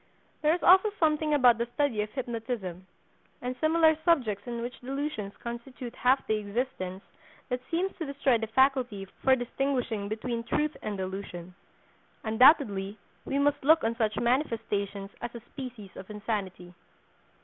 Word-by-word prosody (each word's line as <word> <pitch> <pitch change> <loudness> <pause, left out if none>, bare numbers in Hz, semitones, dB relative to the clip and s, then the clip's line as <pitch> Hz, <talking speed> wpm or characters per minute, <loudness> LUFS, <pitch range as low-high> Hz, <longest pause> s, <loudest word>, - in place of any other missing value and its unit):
There 310 +2 +4
is 355 - -6
also 375 +4 +7
something 310 -1 +2
about 245 -4 +5
the 235 - 0
study 280 -8 +1
of 210 - -3
hypnotism, 225 -8 -4 0.5
and 250 +1 -4
similar 320 0 +5
subjects 240 - +1
in 235 -1 -3
which 245 +1 -6
delusions 270 -6 -4
constitute 235 +1 -7
half 260 +2 +2
the 215 - +1
existence, 205 -3 -3 0.5
that 250 -1 -2
seems 370 +4 -1
to 325 - -4
destroy 270 -4 +2
the 225 - -3
faculty 245 -4 +2 0.2
for 265 0 +5
distinguishing 245 -4 -2
between 230 +2 -3
truth 300 +5 0
and 210 -2 -4
delusion. 185 -2 -6 0.7
Undoubtedly 220 -4 +4 0.3
we 275 - -1
must 285 0 +2
look 320 +3 +5
on 225 +1 0
such 220 -2 0
manifestations 215 -6 -1
as 240 0 -5
a 235 - -7
species 245 -8 -8
of 190 - -10
insanity. 200 -4 -4
240 Hz, 150 wpm, -29 LUFS, 210-275 Hz, 0.7 s, also